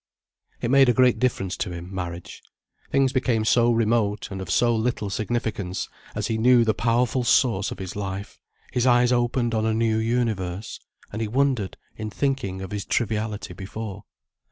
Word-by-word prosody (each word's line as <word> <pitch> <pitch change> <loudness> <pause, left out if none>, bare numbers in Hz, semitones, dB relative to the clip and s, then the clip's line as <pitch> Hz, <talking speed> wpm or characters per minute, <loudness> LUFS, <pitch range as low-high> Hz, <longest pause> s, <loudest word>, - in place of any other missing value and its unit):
It 120 - -1
made 135 -1 +6
a - - +5
great 125 -3 +4
difference 100 -7 0
to - - -2
him, 90 +2 -7
marriage. 90 -2 -6 0.5
Things 135 -1 +3
became 125 -5 +1
so 120 +1 +4
remote 110 -3 +1
and 95 -1 -5
of 95 - -7
so 120 +5 +3
little 110 -3 -1
significance, 105 -4 -2 0.3
as - - -2
he 110 -1 -1
knew 120 0 +5
the 110 - +3
powerful 120 +3 +1
source 115 -4 +3
of - - -6
his 95 -1 -6
life, 100 0 -5 0.3
his 125 +1 +2
eyes 120 0 +4
opened 120 -1 +1
on 110 0 +1
a 110 - +1
new 110 -1 +2
universe, 110 -5 -2 0.3
and 110 - -3
he 110 - -1
wondered 125 -4 0 0.2
in 110 -1 -4
thinking 100 -6 -2
of 95 - -7
his 105 -1 -3
triviality 110 -2 -2
before. 105 +1 -7
110 Hz, 175 wpm, -24 LUFS, 100-120 Hz, 0.5 s, made